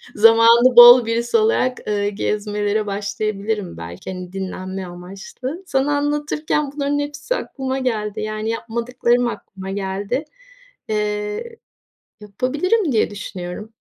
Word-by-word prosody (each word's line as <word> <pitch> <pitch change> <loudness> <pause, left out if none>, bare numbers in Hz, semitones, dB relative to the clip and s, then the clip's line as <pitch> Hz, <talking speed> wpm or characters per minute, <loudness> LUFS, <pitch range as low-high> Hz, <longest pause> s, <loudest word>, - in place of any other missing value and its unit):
zamanı 230 +3 +6
bol 240 0 +10
birisi 235 - +1
olarak, 430 - +2
ııı, 205 -1 0
gezmelere 210 +1 -1
başlayabilirim 200 0 -3
belki, 85 - -8
hani, 180 0 -8
dinlenme 190 0 -5
amaçlı. 195 - -8
Sana 285 -1 +1
anlatırken 295 0 -1
bunların 290 0 0
hepsi 290 +12 -3
aklıma 265 - -4
geldi. 215 -6 -2
Yani, 215 +1 -3
yapmadıklarım 235 +1 0
aklıma 195 -4 -7
geldi. 200 +7 -3 0.7
Eee, 210 - -3 0.6
yapabilirim 290 - 0
diye 220 -3 +2
düşünüyorum. 195 0 -7
220 Hz, 110 wpm, -20 LUFS, 200-260 Hz, 0.7 s, bol